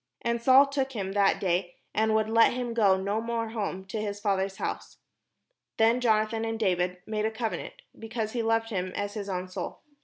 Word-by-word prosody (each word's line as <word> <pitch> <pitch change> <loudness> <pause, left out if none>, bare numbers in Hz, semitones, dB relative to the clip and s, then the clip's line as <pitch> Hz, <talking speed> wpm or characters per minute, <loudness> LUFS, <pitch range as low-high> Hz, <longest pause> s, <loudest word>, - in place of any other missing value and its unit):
And 235 0 0
Saul 260 +3 +7
took 275 -1 -2
him 195 -4 -3
that 200 0 +3
day, 175 -1 -1 0.2
and 220 0 +2
would 215 0 +2
let 230 +1 +5
him 245 -1 -3
go 200 -5 +4
no 200 +3 -1
more 230 -1 -2
home 200 -4 -4
to 210 +3 -4
his 205 -1 -4
father's 195 -2 0
house. - - -5 0.8
Then 230 +3 +4
Jonathan 220 -1 +2
and 225 0 -2
David 180 -3 +1
made 215 0 -2
a - - +2
covenant, 225 0 -4 0.2
because 225 -1 -3
he 240 - -1
loved 225 0 +1
him 185 -2 -2
as 205 0 -3
his 205 -2 -5
own 185 -1 -3
soul. 185 - -6
220 Hz, 195 wpm, -28 LUFS, 195-230 Hz, 0.8 s, Saul